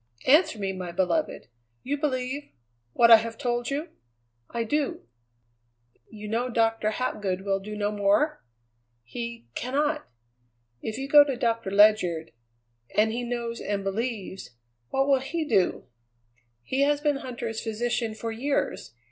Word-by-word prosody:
"Answer 305 -1 +5
me, 195 -2 -2
my 180 -2 -5
beloved! 175 -1 -1 0.4
You 280 +3 -1
believe 280 -1 -2 0.4
what 235 0 +5
I 225 - +12
have 225 0 -5
told 240 -3 -1
you?" 295 +4 -3 0.6
"I 235 - -2
do." 290 +5 -1 1.1
"You 210 -1 -9
know 235 +4 -1
Doctor 225 -2 +1
Hapgood 205 -5 -2
will 195 0 0
do 210 +2 -7
no 205 0 0
more?" 205 - +1 0.6
"He 235 - -6
cannot." 295 - -1 0.7
"If 220 - -4
you 270 +1 -4
go 290 +1 +9
to 280 -2 -2
Doctor 230 -4 0
Ledyard 195 -5 +4 0.7
and 220 +1 +4
he 235 +2 -2
knows 235 -1 -3
and 200 -1 -2
believes 195 - -4 0.3
what 270 +1 +1
will 275 -2 +4
he 315 +5 -3
do?" 190 -11 +1 0.8
"He 265 - -1
has 290 +1 +3
been 295 -1 +1
Huntter's 235 -4 -5
physician 230 0 -2
for 225 +1 -4
years. 240 - -2
230 Hz, 140 wpm, -26 LUFS, 210-270 Hz, 1.1 s, I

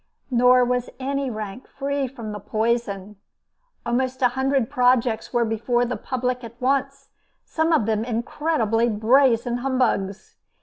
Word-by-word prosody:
Nor 250 +1 +5
was 250 0 -1
any 275 0 -2
rank 215 +1 -6
free 280 0 -2
from 235 -4 -8
the 210 - -6
poison. 210 -1 -2 0.7
Almost 255 +2 -1
a 250 - +6
hundred 265 -1 0
projects 245 -2 +1
were 240 -1 +2
before 230 +2 0
the 245 +1 -3
public 250 0 -3
at 235 +1 -10
once, 275 +1 -1 0.4
some 320 +1 0
of 305 -10 +3
them 220 0 0
incredibly 235 -1 0
brazen 240 +2 +3
humbugs. 245 -7 -1
245 Hz, 135 wpm, -23 LUFS, 225-265 Hz, 0.7 s, a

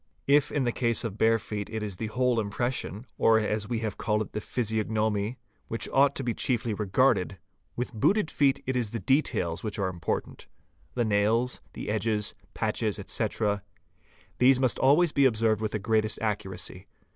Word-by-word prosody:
3 140 - +5
If 145 - +2
in 145 -2 0
the 120 - +1
case 115 -1 +1
of 110 -3 -5
bare 115 0 +4
feet 105 -1 -5
it 110 -1 -4
is 100 -3 -4
the 110 - -3
whole 125 +1 +1
impression, 110 +1 -3
or 115 0 +5
as 105 0 -2
we 115 -2 -1
have 110 -2 -4
called 105 0 +1
it - - -13
the 105 - -3
physiognomy, 110 -1 -1 0.3
which 115 - -3
ought 140 +1 +4
to 135 - -3
be 120 -2 -1
chiefly 120 -3 0
regarded, 100 -1 +1 0.4
with 125 - -3
q 110 - -9
booted 200 - +2
feet 140 -2 +2
it 130 - -1
is 120 -4 0
the 115 - -4
details 110 - +1
which 105 -1 -4
are 95 -2 0
important; 85 -3 -4 0.5
the 120 -2 +1
nails, 110 +4 +1
the - - -7
edges, 105 -1 0
— - - -31
patches, - - -1
etc.: 105 -2 -1 0.8
these 130 +1 +5
must 130 -4 +1
always 150 +5 +4
be 140 -2 +3
observed 110 -3 +2
with 110 -1 -1
the - - +1
greatest 110 +1 0
accuracy. 105 -4 -4
110 Hz, 190 wpm, -28 LUFS, 105-125 Hz, 0.8 s, 3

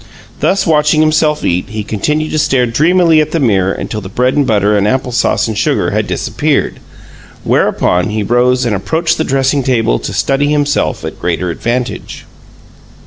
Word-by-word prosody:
Thus, 195 - +1
watching 155 -1 +2
himself 155 -1 +1
eat, 90 +2 -1
he 110 0 -4
continued 150 +10 -2
to 155 - 0
stare 135 -4 +2
dreamily 160 +6 +3
at 155 0 -3
the 165 - +1
mirror 100 -8 +1
until 105 +1 -5
the 95 - -8
bread 125 +5 0
and 145 -2 +1
butter 105 -2 +2
and 100 0 +1
apple 130 +2 -1
sauce 120 - +1
and 110 - -3
sugar - - 0
had - - -1
disappeared, - - -1 0.6
whereupon 90 +2 +1
he 105 0 -2
rose 125 +3 +1
and 110 -3 0
approached 160 - -1
the - - +2
dressing 135 0 0
table 115 - +1
to - - -5
study 140 +1 0
himself 145 -1 0
at - - -7
greater 90 0 -2
advantage. 120 +8 -4
125 Hz, 175 wpm, -13 LUFS, 105-150 Hz, 0.6 s, dreamily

